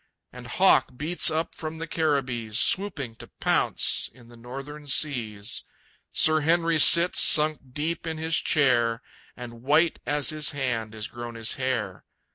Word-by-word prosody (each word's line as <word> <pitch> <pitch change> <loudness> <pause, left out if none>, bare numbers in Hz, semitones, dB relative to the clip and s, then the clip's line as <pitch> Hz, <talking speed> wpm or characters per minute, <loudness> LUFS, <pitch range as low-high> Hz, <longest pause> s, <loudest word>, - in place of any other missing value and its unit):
And 125 0 -11
Hawk 130 -4 +2
beats 165 +6 +1
up 160 +1 -2
from 160 0 -7
the 165 - -5
Caribbees, 130 -9 -2
Swooping 145 - +1
to - - -12
pounce - - 0
in 120 -2 -19
the 120 - -15
Northern 135 +5 -10
seas. 120 -7 -2 0.5
Sir 155 0 +3
Henry 165 +1 +1
sits 170 +4 +6
sunk 155 0 +5
deep 165 +4 -3
in 160 -1 -4
his 160 0 0
chair, 120 -5 +1 0.3
And 120 -2 -10
white 150 +6 +2
as 145 0 0
his 155 -2 +1
hand 120 -6 -3
is 105 -1 -6
grown 120 -1 -9
his 115 0 0
hair. 115 -8 -3
140 Hz, 150 wpm, -25 LUFS, 120-155 Hz, 0.5 s, sits